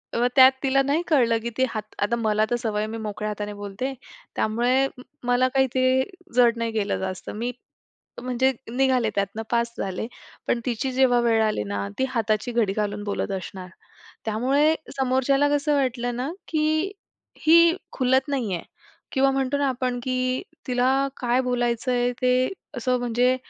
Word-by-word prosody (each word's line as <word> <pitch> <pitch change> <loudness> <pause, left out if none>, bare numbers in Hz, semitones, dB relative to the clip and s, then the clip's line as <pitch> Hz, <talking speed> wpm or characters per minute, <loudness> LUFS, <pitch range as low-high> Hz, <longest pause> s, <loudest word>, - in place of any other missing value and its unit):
मग 240 +1 +3
त्यात 260 -1 +9
तिला 275 0 +3
नाही 285 +4 +1
कळलं 245 -8 +3
की 235 - -2
ती 260 - +3
हात 215 -2 -6
आता 205 +3 +1
मला 215 -2 +1
तर 240 - +1
सवय 220 -3 -2
आहे, 215 - -1
मी 225 - -4
मोकळ्या 215 -1 -4
हाताने 210 0 -4
बोलते. 205 +6 -4 0.4
त्यामुळे 245 +5 +2 0.4
मला 245 +1 +3
काही 265 -1 +3
ते 260 0 +3 0.3
जड 240 -2 +5
नाही 230 0 -1
गेलं 210 -2 -1
जास्त. 185 -1 -5
मी 235 +4 -3 0.7
म्हणजे 255 +1 +1 0.2
निघाले 255 -2 +2
त्यातनं 200 +2 -1
पास 235 0 +1
झाले. 190 +3 -3 0.4
पण 240 - +1
तिची 255 +2 -1
जेव्हा 255 -2 +4
वेळ 225 -2 +3
आली 215 - 0
ना, 100 0 -2
ती - - +3
हाताची 225 -1 0
घडी 225 -5 +1
घालून 205 0 -2
बोलत 205 -1 -2
असणार. 185 0 -8 0.6
त्यामुळे 270 +8 +2 0.2
समोरच्याला 265 +2 +2
कसं 290 +1 +1
वाटलं 245 -3 -1
ना, 255 +5 -3 0.2
की 310 +4 +1 0.5
ही 335 +2 +6 0.2
खुलत 260 +1 +2
नाही 250 -8 -1
आहे 170 - -6 0.5
किंवा 275 0 +3
म्हणतो 270 +1 0
ना 285 0 +1
आपण 250 -1 -2
की 255 0 0 0.3
तिला 250 0 +2 0.3
काय 245 +1 +1
बोलायचंय, 245 0 0
ते 255 0 +3 0.3
असं 250 +1 +1
म्हणजे 245 +1 +2
245 Hz, 165 wpm, -24 LUFS, 220-260 Hz, 0.7 s, त्यात